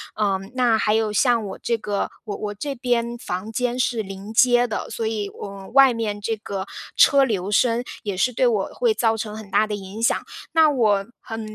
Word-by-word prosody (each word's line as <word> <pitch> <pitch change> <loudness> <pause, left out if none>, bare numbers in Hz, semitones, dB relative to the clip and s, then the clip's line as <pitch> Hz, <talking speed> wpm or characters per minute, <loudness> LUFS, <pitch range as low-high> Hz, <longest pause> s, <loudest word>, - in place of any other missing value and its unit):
嗯， 195 -2 -1
那 245 -3 +3
还 210 -1 +1
有 220 -1 +1
像 230 0 +2
我 195 - -7
这 235 - 0
个 205 -2 -2
我 210 -3 -5
我 210 -1 -4
这 280 +8 -4
边 240 -1 -1
房 195 -2 -5
间 245 +1 -1
是 245 -2 0
临 195 +1 -8
街 245 +1 +5
的， 220 -3 -4
所 225 - -3
以 215 -2 -2
我 195 -1 -8
外 270 -2 +7
面 210 -3 -3
这 225 +1 -2
个 200 -2 -5 0.3
车 275 -1 +6
流 200 -5 -2
声， 235 +3 +2 0.2
也 205 -2 -3
是 250 +7 +1
对 250 +1 +2
我 215 -5 +1
会 475 -3 +2
造 225 - +1
成 215 -1 -5
很 215 -2 -10
大 210 +2 +3
的 210 - -2
影 200 +2 -8
响。 230 - +3 0.4
那 320 -1 +6
我 210 -8 +2
很 225 0 -6
220 Hz, 225 characters per minute, -22 LUFS, 205-240 Hz, 0.4 s, 外